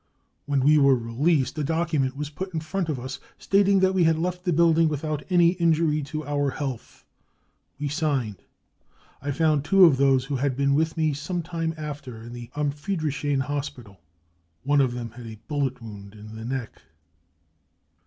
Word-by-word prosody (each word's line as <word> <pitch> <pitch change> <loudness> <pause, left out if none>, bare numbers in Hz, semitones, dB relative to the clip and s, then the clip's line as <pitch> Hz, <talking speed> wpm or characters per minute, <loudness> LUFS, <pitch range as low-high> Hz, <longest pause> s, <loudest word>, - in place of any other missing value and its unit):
When 140 -2 +1
we 150 +3 +5
were 140 -1 +5
released, 130 +4 0
a - - 0
document 155 -4 0
was 150 0 -4
put 185 +3 -6
in - - +1
front 165 +3 -3
of 145 -5 -2
us 130 +2 -6 0.2
stating 195 -1 +3
that 190 0 +3
we 185 -2 +3
had 160 -1 +3
left 180 +2 -3
the 180 - +2
building 165 0 +4
without 150 0 -3
any 175 -2 +5
injury 165 -3 +2
to 155 +2 -5
our 145 -1 0
health. 135 -3 -6 0.7
We 145 - -2
signed. 140 - -1 0.8
I 145 - -4
found 150 0 +2
two 195 +3 +6
of 150 -6 +5
those 135 -1 +3
who 140 -1 -2
had 130 -1 -1
been 140 0 +2
with 160 +3 +1
me 155 -2 +1
some 165 +5 -3
time 165 -1 -3
after 145 -5 -6
in 120 +1 -9
the 120 -1 -8
* - - -26
Am 145 -1 0
Friedrichshain 145 -3 -2
5 - - -3
hospital. 125 -9 -5 0.6
One 145 +1 +3
of 130 -3 +1
them 120 -2 -5
had 120 0 -10
a 110 -1 -9
bullet 140 -4 -1
wound 100 -2 -10
in 105 +1 -11
the 110 0 -7
neck. 130 -1 -5
145 Hz, 190 wpm, -25 LUFS, 130-160 Hz, 0.8 s, two